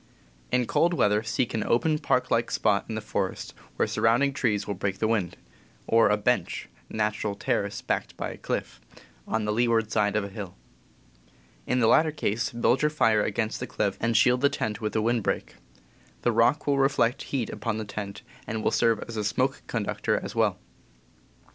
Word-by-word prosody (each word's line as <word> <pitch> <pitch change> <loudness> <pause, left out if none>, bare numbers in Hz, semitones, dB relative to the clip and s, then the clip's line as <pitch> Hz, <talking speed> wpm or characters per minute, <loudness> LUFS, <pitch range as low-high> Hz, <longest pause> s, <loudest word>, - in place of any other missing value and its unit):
In 125 -1 +2
cold 170 +8 +2
weather 105 -6 +3
seek 115 +2 -1
an 110 - 0
open, 155 +6 +1
park 125 - 0
like 115 +1 +2
spot 100 -1 +1
in 110 - -3
the 110 - -3
forest, 105 - -3 0.2
where - - +1
surrounding 125 +5 +2
trees 105 -7 0
will 100 - -2
break 95 0 -2
the 110 - 0
wind; 105 -6 -1 0.5
or 115 -1 +4
a 105 - +3
"bench" 125 +4 0 0.2
(natural 105 -1 -1
terrace - - -2
backed - - -2
by - - -3
a - - -9
cliff) - - -4 0.5
on 110 -1 -1
the 105 - 0
leeward 115 -1 +2
side 105 -2 +1
of 105 - +1
a 100 - -5
hill. 100 -3 -7 1.1
In 125 - +1
the 115 - +4
latter 155 +7 +5
case, 115 -7 -1
build 120 +2 +2
your 150 - +3
fire 115 -8 +3
against 110 +1 -1
the - - -4
cliff, 100 -2 -1
and 115 0 +1
shield 125 0 +4
the 140 - +5
tent 110 -5 -3
with 105 -1 -3
a 110 - +2
wind 120 +1 +1
break. - - -3 0.7
The 120 - +3
rock 120 +6 +3
will 140 -1 +2
reflect 135 -3 +2
heat 125 -6 -3
upon 110 +1 -3
the 110 - -4
tent, 100 -1 -6 0.2
and 110 0 -3
will - - +2
serve 115 -2 +2
as 115 -1 -7
a 105 - -1
smoke 105 - 0
conductor - - -1
as - - -6
well. - - +1
115 Hz, 195 wpm, -27 LUFS, 105-125 Hz, 1.1 s, latter